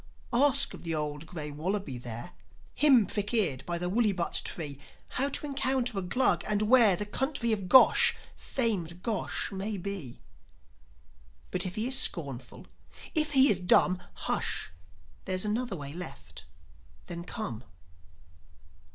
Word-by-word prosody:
Ask 270 +3 +4
of - - -10
the 165 -1 -2
old 150 0 -4
grey 150 -3 -6
wallaby 160 -3 -3
there 120 +7 -8 0.4
Him 265 -7 +5
prick 205 +4 -2
eared 150 - +1
by 175 -1 -2
the 180 +1 -2
woollybutt 195 -3 +1
tree 145 -5 -4 0.3
How 275 +2 -1
to 285 - -1
encounter 260 -5 0
a - - -3
Glug, 245 +8 +1
and 210 0 +1
where 220 -3 +5
The 210 - -4
country 250 +2 -1
of 200 -4 -2
Gosh, 260 - +7 0.2
famed 180 -8 -3
Gosh 215 -1 -2
may 200 +2 -4
be. 185 -9 -6 1.3
But, 185 - -1
if 180 - -6
he 220 +3 -1
is 265 0 +1
scornful, 135 -7 -1 0.5
if 305 -2 +3
he 270 0 +8
is 200 -9 +3
dumb, 180 0 +3 0.2
Hush! - - -1 0.5
There's 185 +1 -2
another 220 0 -2
way 140 -3 -7
left. 160 - -9 0.6
Then 170 -1 -6
come. 150 - -6
195 Hz, 145 wpm, -29 LUFS, 170-235 Hz, 1.3 s, he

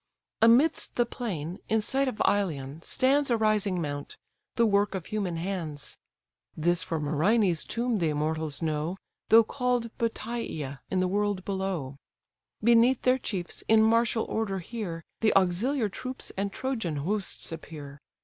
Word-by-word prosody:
Amidst 235 +8 +4
the 240 - +3
plain, 185 - -5
in 220 - +3
sight 270 +5 0
of 250 - -3
Ilion, 155 -7 -1
stands 275 - +2
A 235 - +3
rising 215 -4 +1
mount, 145 -3 -4 0.4
the 235 - +4
work 205 -1 +2
of 185 - -4
human 195 -6 -2
hands; 165 -5 -4 0.6
(This 175 +3 +2
for 165 -3 -2
Myrinne's 165 +5 +2
tomb 235 -1 -1
the 165 -3 +1
immortals 155 +1 -1
know, 155 +3 -1 0.3
Though 225 +1 +8
call'd 245 -1 -1
Bateïa 225 - -3
in 185 -1 +1
the 185 - +2
world 205 0 0
below;) 190 -9 -3 0.7
Beneath 235 +2 +5
their 255 +1 +3
chiefs 185 -7 -3
in 220 0 +6
martial 230 0 +3
order 215 -3 -2
here, 180 -3 -5 0.2
The 220 - +3
auxiliar 210 +7 +2
troops 255 +6 -5
and 200 +1 -2
Trojan 225 - -2
hosts 185 +8 -2
appear. 150 -3 -8
200 Hz, 145 wpm, -28 LUFS, 165-230 Hz, 0.7 s, Though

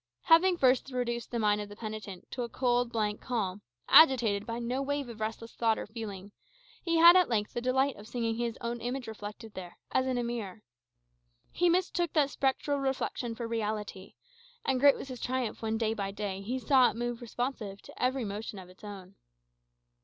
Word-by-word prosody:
Having 350 +2 +5
first 260 -2 +3
reduced 240 -2 -2
the 240 - -3
mind 210 -2 +2
of 205 - -7
the 205 - -10
penitent 215 -4 -7
to 250 - -4
a 235 - -3
cold, 245 -1 +1
blank 210 -2 -1
calm, 205 -6 -2 0.3
agitated 235 -9 +6
by 230 0 -3
no 240 +3 -2
wave 285 -1 -2
of 225 -2 -9
restless 225 +1 -4
thought 225 -2 +1
or - - -4
feeling, 205 -3 -7 0.5
he 335 -2 +1
had 340 +2 +9
at 365 -5 +5
length 210 -3 0
the 240 - -2
delight 265 +2 +1
of 205 +1 -11
seeing 235 -1 -1
his 235 -1 -2
own 235 0 -3
image 250 +2 -3
reflected 210 0 -8
there, 180 -2 -9
as 260 0 +2
in 255 -1 0
a 245 - 0
mirror. 225 -4 -5 0.9
He 350 0 +2
mistook 350 -1 +1
that 285 -3 +3
spectral 280 +1 0
reflection 265 -3 -2
for 235 - -6
a - - -2
reality, 210 -4 -4 0.5
and 265 -1 +1
great 280 +1 +7
was 275 - -8
his 255 -2 -7
triumph 255 -3 -2
when, 220 0 -1
day 220 -1 0
by 200 -3 -3
day, 195 -1 -4
he 240 +6 -3
saw 260 -1 +5
it - - -7
move 240 +1 -3
responsive 235 -4 -4
to - - -8
every 255 -1 +1
motion 205 +1 -5
of 185 -1 -10
his 185 - -19
own. 195 -2 -9
235 Hz, 200 wpm, -30 LUFS, 210-260 Hz, 0.9 s, had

